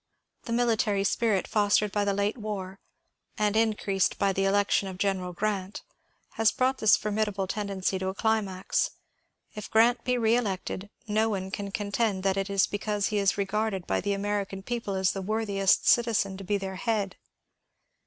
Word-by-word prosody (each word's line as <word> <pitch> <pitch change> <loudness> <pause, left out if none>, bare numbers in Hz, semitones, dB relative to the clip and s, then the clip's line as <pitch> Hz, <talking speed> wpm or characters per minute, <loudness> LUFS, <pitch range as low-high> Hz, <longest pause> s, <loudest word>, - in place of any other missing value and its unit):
The 230 - -5
military 225 -4 +1
spirit 205 -1 +1
fostered 205 -1 +2
by 205 0 0
the 200 - +1
late 200 +1 0
war, 200 -4 -5 0.6
and 210 0 +1
increased 210 -3 +1
by 200 -1 +1
the 195 +1 0
election 200 0 +2
of 190 -1 -7
General 190 -2 -1
Grant, 195 +1 -3 0.6
has 225 -1 +5
brought 260 +1 0
this 215 -1 +5
formidable 210 -2 -1
tendency 195 -1 -2
to 190 - -3
a 190 - -3
climax. 205 -4 0 0.6
If 210 - -7
Grrant 235 +2 +4
be 250 0 +1
reelected, 220 -4 0 0.2
no 215 +1 +2
one 190 -2 -3
can 200 0 -4
contend 200 0 -1
that 195 -1 +2
it 195 0 -2
is 195 -1 +3
because 205 0 -2
he 210 -1 0
is 200 0 +2
regarded 200 -1 -1
by - - 0
the 200 +2 -1
American 200 -1 -3
people 230 -3 -3
as 190 -1 +2
the 195 - -4
worthiest 200 -1 +1
citizen 225 -5 +3
to 195 - -8
be 205 +2 0
their 190 -1 -5
head. 210 -5 -1
205 Hz, 170 wpm, -27 LUFS, 195-215 Hz, 0.6 s, has